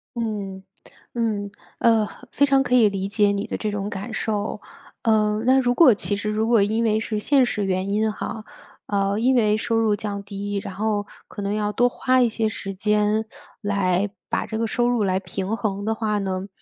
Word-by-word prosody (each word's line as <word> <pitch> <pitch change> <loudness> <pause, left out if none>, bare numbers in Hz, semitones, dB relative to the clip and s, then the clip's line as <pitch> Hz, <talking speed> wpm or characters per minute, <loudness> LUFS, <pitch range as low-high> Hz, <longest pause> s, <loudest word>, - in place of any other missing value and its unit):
嗯， 205 -5 -4 0.5
嗯。 215 -4 -1 0.3
呃， 225 -2 +4
和 - - -13
非 285 - +3
常 275 -1 +3
可 250 -1 +1
以 235 -4 +6
理 195 -1 -3
解 205 0 +2
你 200 +1 -2
的 - - -3
这 215 - -2
种 205 0 -3
感 205 +3 -6
受， 210 -1 -2 0.4
呃， 215 -2 +2
那 260 +2 +5
如 245 -2 +2
果 260 -2 +7
其 205 - -2
实 210 +1 -3
如 215 +1 0
果 230 -3 +4
因 220 +3 +1
为 215 -1 +2
是 220 -1 -2
现 270 +4 +3
实 210 -4 -2
原 190 0 -1
因 215 +2 +1
哈， 215 +1 -6 0.4
呃， 200 0 0
因 255 +3 +3
为 215 -3 +3
收 230 +1 -1
入 225 -2 +3
降 205 -1 -5
低， 200 0 -4
然 190 - -7
后 205 0 -1 0.2
可 - - -8
能 200 0 -1
要 210 -1 0
多 245 +4 +3
花 255 +1 +2
一 240 - +4
些 220 0 -1
时 195 -2 -5
间， 210 +2 +1 0.4
来 200 -1 +1 0.2
把 - - -1
这 220 - -4
个 230 - 0
收 240 +2 +1
入 245 -3 +1
来 190 -1 +1
平 195 +2 -3
衡 200 -1 -2
的 220 +1 0
话 215 -2 -1
呢， 190 -1 -3
210 Hz, 225 characters per minute, -23 LUFS, 200-225 Hz, 0.5 s, 果